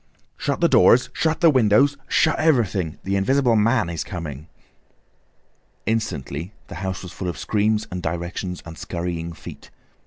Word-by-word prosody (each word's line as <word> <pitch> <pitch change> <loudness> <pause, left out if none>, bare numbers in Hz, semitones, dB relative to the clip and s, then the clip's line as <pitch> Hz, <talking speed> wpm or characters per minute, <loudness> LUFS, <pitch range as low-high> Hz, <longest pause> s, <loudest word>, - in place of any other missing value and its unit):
"Shut - - -2
the - - +5
doors, 125 +1 +5
shut 160 +1 0
the 165 -2 +7
windows, 130 +3 +4
shut 155 - +2
everything!—the 100 - +1
Invisible 125 +4 +2
Man 110 -1 +3
is 85 -2 -3
coming!" 80 -5 -7 1.4
Instantly 95 -5 -3 0.2
the - - -8
house 95 0 -4
was 90 - -8
full 90 0 -4
of 85 - -5
screams 110 0 0
and 90 0 -4
directions, 85 +2 -4
and 85 -1 -9
scurrying 85 -1 -4
feet. 80 - -11
95 Hz, 145 wpm, -22 LUFS, 85-120 Hz, 1.4 s, the